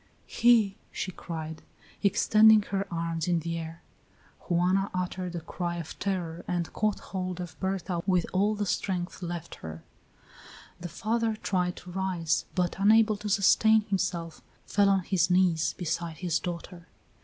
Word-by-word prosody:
"He!" 225 Hz, -5 st, +3 dB
she 185 Hz, -, -4 dB
cried, 160 Hz, -2 st, -6 dB, 0.4 s
extending 215 Hz, +1 st, +5 dB
her 195 Hz, 0 st, -2 dB
arms 165 Hz, -1 st, -2 dB
in 175 Hz, -1 st, +2 dB
the 165 Hz, +1 st, -3 dB
air. 165 Hz, +1 st, -8 dB, 0.7 s
Juana 185 Hz, +3 st, +2 dB
uttered 180 Hz, -1 st, -3 dB
a 170 Hz, -, -3 dB
cry 175 Hz, +1 st, -4 dB
of 170 Hz, -2 st, -7 dB
terror 175 Hz, -4 st, -3 dB
and 175 Hz, -2 st, -2 dB
caught 215 Hz, -1 st, 0 dB
hold 185 Hz, -1 st, -3 dB
of 175 Hz, -3 st, -6 dB
Berta 190 Hz, -2 st, -2 dB
with 180 Hz, -3 st, +3 dB
all 205 Hz, +3 st, +2 dB
the 205 Hz, 0 st, -2 dB
strength 185 Hz, -1 st, -2 dB
left 170 Hz, -1 st, -5 dB
her; 80 Hz, 0 st, -8 dB, 1.0 s
the 175 Hz, 0 st, -6 dB
father 225 Hz, +3 st, -1 dB
tried 180 Hz, -4 st, -1 dB
to 180 Hz, -, -11 dB
rise, 180 Hz, -3 st, -1 dB
but, 180 Hz, -2 st, 0 dB
unable 215 Hz, +2 st, +5 dB
to 210 Hz, +1 st, -5 dB
sustain 220 Hz, +2 st, +5 dB
himself, 175 Hz, -5 st, -2 dB, 0.2 s
fell 200 Hz, -1 st, +3 dB
on 195 Hz, -1 st, +3 dB
his 180 Hz, -1 st, +1 dB
knees 180 Hz, -3 st, +3 dB
beside 170 Hz, -1 st, -3 dB
his 175 Hz, -3 st, 0 dB
daughter. 175 Hz, 0 st, -7 dB
180 Hz, 150 wpm, -28 LUFS, 170-200 Hz, 1.0 s, extending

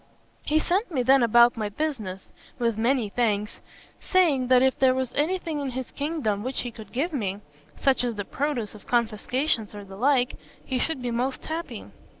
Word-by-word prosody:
He 305 Hz, -, +1 dB
sent 375 Hz, +7 st, +1 dB
me 260 Hz, -6 st, 0 dB
then 265 Hz, +2 st, +5 dB
about 235 Hz, +1 st, +6 dB
my 215 Hz, -3 st, -2 dB
business, 210 Hz, -7 st, -3 dB, 0.3 s
with 235 Hz, -3 st, +1 dB
many 235 Hz, 0 st, +1 dB
thanks; 210 Hz, -1 st, -1 dB, 0.4 s
saying, 310 Hz, -9 st, +2 dB
that 255 Hz, 0 st, +5 dB
if 265 Hz, 0 st, +2 dB
there 260 Hz, -1 st, +4 dB
was 260 Hz, -2 st, -2 dB
any 320 Hz, +6 st, +1 dB
thing 325 Hz, -4 st, -4 dB
in 280 Hz, -2 st, -2 dB
his 255 Hz, 0 st, -5 dB
kingdom 285 Hz, -9 st, -2 dB
which 255 Hz, +4 st, -2 dB
he 245 Hz, -, -5 dB
could 220 Hz, -1 st, -12 dB
give 305 Hz, +7 st, -1 dB
me 200 Hz, -7 st, -2 dB, 0.4 s
such 270 Hz, -2 st, +2 dB
as 240 Hz, -2 st, -1 dB
the 205 Hz, -1 st, -4 dB
produce 265 Hz, -6 st, -2 dB
of 210 Hz, -, -14 dB
confiscations 235 Hz, 0 st, 0 dB
or 205 Hz, -, -7 dB
the 195 Hz, 0 st, -11 dB
like 255 Hz, +1 st, +2 dB, 0.3 s
he 260 Hz, -1 st, -1 dB
should 270 Hz, -2 st, -2 dB
be 245 Hz, -, -1 dB
most 255 Hz, +3 st, -2 dB
happy. 330 Hz, +2 st, -5 dB
250 Hz, 190 wpm, -26 LUFS, 220-285 Hz, 0.4 s, about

